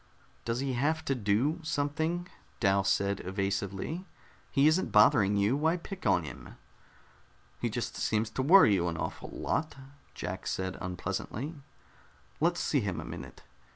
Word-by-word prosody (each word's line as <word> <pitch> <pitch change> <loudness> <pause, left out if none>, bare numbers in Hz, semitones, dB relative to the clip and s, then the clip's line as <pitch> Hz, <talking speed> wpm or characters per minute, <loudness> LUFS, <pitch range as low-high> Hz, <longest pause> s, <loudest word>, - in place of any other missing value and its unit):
"Does 115 +2 -1
he 135 -1 -1
have 150 +6 0
to 135 - +1
do 125 - +1
something?" 160 +3 -1 0.3
Dal 100 -2 +3
said 100 0 +1
evasively. 100 - -2 0.5
"He 140 0 +3
isn't 155 +5 +3
bothering 105 -7 +5
you. 100 +6 +3
Why 160 +4 +2
pick 185 - -6
on 95 -3 +3
him?" 65 -5 -9 1.0
"He - - -1
just - - -3
seems 110 0 0
to 130 - -2
worry 155 - +7
you 90 -3 +1
an 85 -1 -2
awful - - -5
lot," 155 - -2 0.4
Jack - - -5
said 95 0 -2
unpleasantly. 100 - -4 0.9
"Let's 170 +2 +2
see 145 - +2
him 100 -6 -2
a - - -6
minute." - - -9
120 Hz, 150 wpm, -30 LUFS, 100-155 Hz, 1.0 s, worry